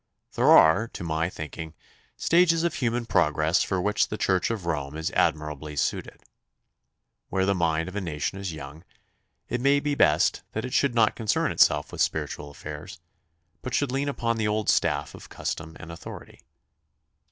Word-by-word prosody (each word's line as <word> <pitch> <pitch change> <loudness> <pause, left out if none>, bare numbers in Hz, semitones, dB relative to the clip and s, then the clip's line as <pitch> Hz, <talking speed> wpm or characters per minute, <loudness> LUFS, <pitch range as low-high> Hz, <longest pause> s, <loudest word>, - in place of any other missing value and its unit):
There - - +3
are, 80 +9 +6
to - - -6
my 80 0 -1
thinking, 80 0 -7 0.4
stages 170 -1 +3
of 170 -2 0
human 120 -5 -1
progress 80 -3 +2
for 95 - -1
which 105 +3 +1
the 105 - -5
Church 95 -3 +1
of 110 -6 -3
Rome 75 -3 -3
is 80 - -2
admirably 75 -1 -1
suited. - - -2 1.1
Where 95 0 +1
the 100 - +2
mind 80 -3 0
of 95 - -8
a 105 - -1
nation 80 +2 -3
is 95 -2 -4
young, 80 +1 -9 0.6
it 125 - -2
may 140 +2 +4
be 145 0 -1
best 75 - +3
that 110 - -3
it 125 - -6
should 140 -4 +2
not 110 -2 +3
concern 110 -2 0
itself - - +3
with - - -4
spiritual 75 - -2
affairs, 75 +5 -9 0.6
but 130 - -3
should 145 -3 0
lean 140 +2 -1
upon 115 -4 -1
the 110 -1 0
old 105 0 0
staff - - 0
of - - -12
custom 80 0 -5
and 80 - -9
authority. 85 - -10
90 Hz, 175 wpm, -26 LUFS, 80-115 Hz, 1.1 s, are